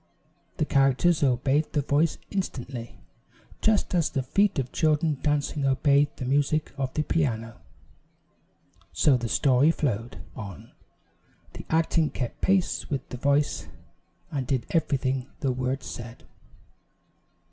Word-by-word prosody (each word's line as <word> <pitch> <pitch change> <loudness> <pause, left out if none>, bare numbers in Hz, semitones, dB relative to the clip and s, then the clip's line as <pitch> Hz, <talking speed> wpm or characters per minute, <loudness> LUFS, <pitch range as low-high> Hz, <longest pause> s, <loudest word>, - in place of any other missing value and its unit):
The - - +1
characters 135 +5 +3
obeyed 135 +3 +1
the 145 - +1
voice 145 +3 +1
instantly, 130 - -4 0.6
just 215 -3 +2
as 170 -3 +2
the 135 - -2
feet 200 +9 +2
of 130 -2 -2
children 155 -2 +1
dancing 145 -1 0
obey 140 +1 +3
the 130 - -5
music 145 +3 +1
of 135 -2 -2
the 155 - +1
piano. 115 -8 -1 1.3
So 145 - +4
the 120 -2 -2
story 135 +3 +4
flowed 120 -8 -1 0.2
on 100 -7 -9 0.8
the - - -9
acting 160 -1 +2
kept 125 -3 -5
pace 190 -2 +1
with 135 -3 -3
the 125 - -6
voice 140 +2 +1 0.6
and 135 -4 -3
did 130 -3 0
everything 135 -5 0
the 135 - +1
words 130 +2 -2
said. 120 0 -8
140 Hz, 125 wpm, -26 LUFS, 130-155 Hz, 1.3 s, So